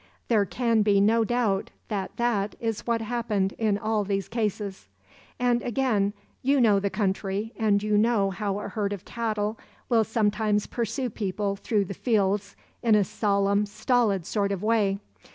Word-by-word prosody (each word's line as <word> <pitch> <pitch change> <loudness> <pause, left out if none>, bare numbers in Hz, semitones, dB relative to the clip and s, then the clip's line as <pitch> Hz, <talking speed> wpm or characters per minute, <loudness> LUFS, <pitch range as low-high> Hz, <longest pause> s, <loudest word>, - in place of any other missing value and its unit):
There 215 -4 +4
can 230 +3 +1
be 205 -1 +4
no 225 +3 +4
doubt 220 -4 0 0.2
that 200 -3 -3
that 220 -4 0
is 225 -1 -3
what 230 -1 +1
happened 220 -4 -1
in 215 -3 +2
all 215 0 0
these 195 -1 -2
cases. 210 - -3 0.5
"And 245 -1 +2
again; 225 -5 +1 0.3
you 275 +2 +3
know 215 -5 +5
the 200 0 -1
country 195 +2 -2
and 210 -3 +2
you 210 -1 +2
know 210 -3 +2
how 200 +1 -2
a 205 - -5
herd 205 0 -2
of 195 - -8
cattle 220 -2 -2 0.3
will 230 -3 +4
sometimes 210 -1 +1
pursue 240 +2 -2
people 200 -1 -2
through 205 0 0
the 195 - -5
fields 200 -2 0 0.3
in 225 -3 +4
a 210 - +4
solemn, 200 +1 +1
stolid 210 -3 +1
sort 200 0 0
of 195 0 -3
way. 210 -3 +2
210 Hz, 165 wpm, -26 LUFS, 200-230 Hz, 0.5 s, know